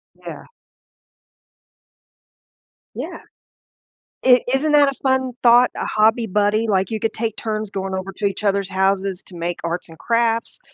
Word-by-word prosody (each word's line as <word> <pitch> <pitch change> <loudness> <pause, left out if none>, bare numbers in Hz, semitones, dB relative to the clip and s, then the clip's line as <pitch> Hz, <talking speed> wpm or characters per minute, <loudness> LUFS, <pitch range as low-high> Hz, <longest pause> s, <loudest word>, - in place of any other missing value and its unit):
Yeah. - - -10 2.5
Yeah. - - -6 1.1
I 250 -1 +7
isn't 300 +3 +1
that 290 -1 +6
a - - -4
fun 260 -1 +1
thought, 245 +1 +6
a - - -3
hobby 220 +2 +2
buddy? 210 +3 +1
Like 190 0 0
you 220 - -2
could 225 - -1
take 225 -1 -3
turns 215 -2 -4
going 190 -1 -3
over 190 +1 -5
to 205 - -2
each 200 +2 -2
other's 200 -1 0
houses 190 0 0
to 180 - -13
make 170 +1 -4
arts 170 0 -4
and 160 - -13
crafts, 230 0 0
215 Hz, 150 wpm, -20 LUFS, 190-235 Hz, 2.5 s, I